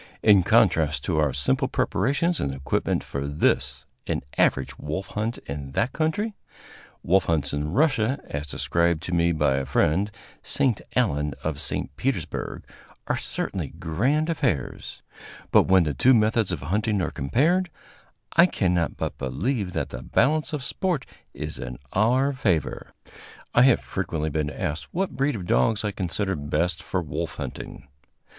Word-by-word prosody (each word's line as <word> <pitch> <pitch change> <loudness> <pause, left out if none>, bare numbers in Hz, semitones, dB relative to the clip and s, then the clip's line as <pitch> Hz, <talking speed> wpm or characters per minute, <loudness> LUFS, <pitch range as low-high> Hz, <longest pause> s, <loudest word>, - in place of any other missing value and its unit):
In 105 -3 +7
contrast 75 -5 +3
to 80 -4 0
our 75 -2 +2
simple 65 0 0
preparations 165 +5 +1
and 70 -1 -2
equipment 70 0 -1
for 70 0 -4
this, 75 +2 0 0.2
an - - -1
average 65 - +2
wolf 80 +6 -4
hunt 110 +3 -2
in 70 -1 -6
that 125 - 0
country, 165 +8 0 0.7
wolf 95 +2 +3
hunts 75 -5 0
in 75 +1 -2
Russia, 135 - +2
as 75 +1 -4
described 85 +2 0
to - - -5
me 85 0 +3
by 75 -4 +2
my - - -2
friend, 80 +9 +2 0.3
St. 125 -6 +1
Allen, 75 - +1
of 75 -2 -2
St. 70 - -2
Petersburg, - - -3 0.4
are - - 0
certainly - - -3
grand 130 - 0
affairs; 80 - -2 0.5
but - - +5
when 95 -1 +6
the 75 -2 -1
two 125 - +5
methods 110 -2 +2
of 85 - -3
hunting 105 +7 0
are 85 - -1
compared, 160 - +1 0.7
I 170 +2 +7
cannot 90 - 0
but - - -4
believe 100 - -2
that - - -2
the - - -7
balance 155 +2 +2
of 150 -3 -3
sport 170 -1 -1 0.3
is - - -5
in - - -6 0.2
our 125 +7 +3
favor. 100 - -1 0.6
I 120 - +6
have 130 - +5
frequently 80 -5 -3
been 75 0 -1
asked 75 +2 -4
what 190 +2 -1
breed 140 0 +1
of 95 -5 -5
dogs 95 - +2
I 105 - 0
consider 95 +1 -1
best 85 +4 -1
for 95 -2 -2
wolf 75 - -4
hunting. 70 - -7
90 Hz, 155 wpm, -25 LUFS, 75-125 Hz, 0.7 s, In